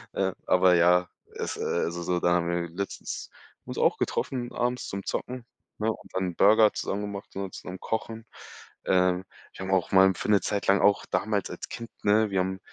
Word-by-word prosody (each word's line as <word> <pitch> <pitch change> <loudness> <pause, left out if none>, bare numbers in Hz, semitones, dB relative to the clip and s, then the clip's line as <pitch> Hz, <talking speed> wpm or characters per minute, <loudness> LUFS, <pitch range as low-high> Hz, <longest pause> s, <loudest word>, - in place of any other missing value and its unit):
ähm, 95 -1 0
aber 90 0 +5
ja, 90 +1 +4 0.3
es - - -4
äh, - - -6
also, 85 0 -1
so, 90 +1 0
da - - +3
haben 85 -1 +1
wir 85 0 -1
letztens 100 +4 -5 0.4
uns - - -7
auch - - +3
getroffen 125 -2 -2
abends 125 +1 -1
zum 100 0 -5
Zocken, 125 -1 -4 0.4
ne, 110 +1 +1
und - - -11
dann 95 -2 -2
Burger 105 +3 +6
zusammen 100 - -3
gemacht 100 -1 -7
und 95 -1 -4
zusammen 90 0 -8
Kochen. 110 0 -4 0.6
Ähm, 90 0 +2 0.3
wir 95 - -6
haben 95 - -3
auch 95 -2 +1
mal 95 0 +8
'n 95 - +2
für - - -4
'ne 100 -2 +5
Zeit 100 +3 -2
lang 100 0 +4
auch 100 0 +3
damals 105 -2 0
als - - -7
Kind 115 0 -7
ne, 105 +1 +3
wir 95 - +1
haben 95 +1 -3
95 Hz, 205 wpm, -27 LUFS, 90-105 Hz, 0.6 s, mal